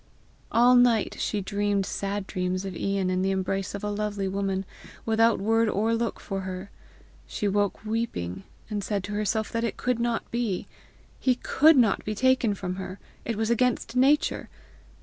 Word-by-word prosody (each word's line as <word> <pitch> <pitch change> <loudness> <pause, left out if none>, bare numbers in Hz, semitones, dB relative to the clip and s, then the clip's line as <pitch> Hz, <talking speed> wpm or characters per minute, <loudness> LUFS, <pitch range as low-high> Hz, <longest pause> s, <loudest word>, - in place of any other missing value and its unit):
All 240 +2 +6
night 245 -3 +4
she 210 - -1
dreamed 200 0 0
sad 200 +1 -3
dreams 185 0 -2
of 190 -2 -5
Ian 195 0 0
in 185 0 0
the 190 - +1
embrace 195 +1 -1
of 200 - -6
a 210 - -1
lovely 205 -1 -2
woman, 195 0 -1 0.4
without 225 0 +3
word 225 +2 +2
or 220 +3 +1
look 230 0 -1
for 195 -1 -4
her. 185 +1 -6 0.6
She 205 - -2
woke 205 +1 0
weeping, 215 - -2 0.3
and 210 -2 -3
said 200 -1 -2
to 205 - -6
herself 215 +1 -1
that 230 0 -1
it 230 - -2
could 250 -2 0
not 235 -1 -1
be. 230 -6 -1 0.5
He 255 -2 +2
COULD 305 +4 +4
not 225 -6 +3
be 215 - -3
taken 260 -3 +3
from 185 -1 -4
her! 185 0 -6 0.3
it 230 - -2
was 220 +2 0
against 245 0 +1
nature! 275 +4 +2
205 Hz, 175 wpm, -26 LUFS, 195-230 Hz, 0.6 s, All